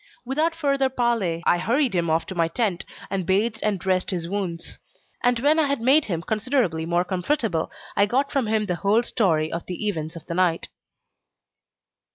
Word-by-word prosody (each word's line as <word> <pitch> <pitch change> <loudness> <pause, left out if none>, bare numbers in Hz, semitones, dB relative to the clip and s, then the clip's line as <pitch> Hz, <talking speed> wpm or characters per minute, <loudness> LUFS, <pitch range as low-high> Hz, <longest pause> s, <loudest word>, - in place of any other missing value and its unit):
Without 310 +6 0
further 275 -4 +1
parley, 230 -10 0
I 175 - +3
hurried 250 +4 +1
him 170 -2 0
off 160 +1 +1
to - - -6
my 170 -2 +1
tent, 185 0 -1 0.3
and 195 -1 -1
bathed 210 +5 +1
and 210 -2 0
dressed 185 0 0
his 175 -3 -3
wounds; 180 -3 -4 0.4
and 245 0 +3
when 300 +4 +4
I 305 - +3
had 280 -2 0
made 270 +6 +4
him 170 -4 -3
considerably 215 - 0
more 175 +1 +1
comfortable, 185 - -1 0.3
I 200 - +4
got 270 +6 0
from 265 -5 0
him 215 0 +1
the 180 -3 -2
whole 210 +5 +2
story 160 -10 +1
of 170 - -5
the 185 +4 -4
events 160 -5 -3
of 165 - -10
the - - -5
night. 175 -2 +1
200 Hz, 190 wpm, -24 LUFS, 170-245 Hz, 0.4 s, when